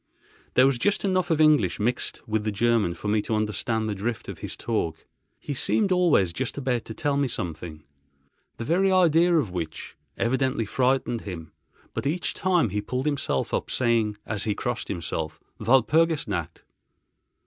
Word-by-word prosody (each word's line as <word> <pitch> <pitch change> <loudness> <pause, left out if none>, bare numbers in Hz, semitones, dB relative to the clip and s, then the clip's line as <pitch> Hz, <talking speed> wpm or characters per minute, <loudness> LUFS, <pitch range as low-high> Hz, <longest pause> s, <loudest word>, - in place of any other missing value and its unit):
There 130 - +7
was 135 -3 +2
just 205 +8 +1
enough 185 -2 +1
of 160 -2 +2
English 150 - +4
mixed 120 +4 -2
with 110 -1 0
the 110 - -1
German 105 -4 +1
for - - -6
me 105 0 +2
to 110 - -2
understand 110 +1 -1
the 105 - -1
drift 110 +4 -3
of - - -7
his - - -5
talk. 85 -9 -2 0.3
He 145 - -5
seemed 195 - +2
always 170 - +3
just 130 +6 -3
about 125 -4 -1
to 110 - -8
tell 145 -1 0
me 140 -1 +2
something—the 75 - -9
very 185 +9 +2
idea 175 -1 +4
of 125 - 0
which 85 -3 -5 0.2
evidently 130 -1 0
frightened 125 0 0
him; 85 -5 -7 0.4
but - - -2
each 170 +5 -1
time 180 - +2
he 105 +2 -2
pulled 125 +6 -3
himself 145 -2 -1
up, - - -1
saying, 115 -4 +1
as 105 -1 -2
he 105 -2 0
crossed 120 -2 -3
himself: 80 -3 -4 0.2
"Walpurgis 145 +7 +3
Nacht!" 85 -5 -4
115 Hz, 170 wpm, -25 LUFS, 100-145 Hz, 0.4 s, There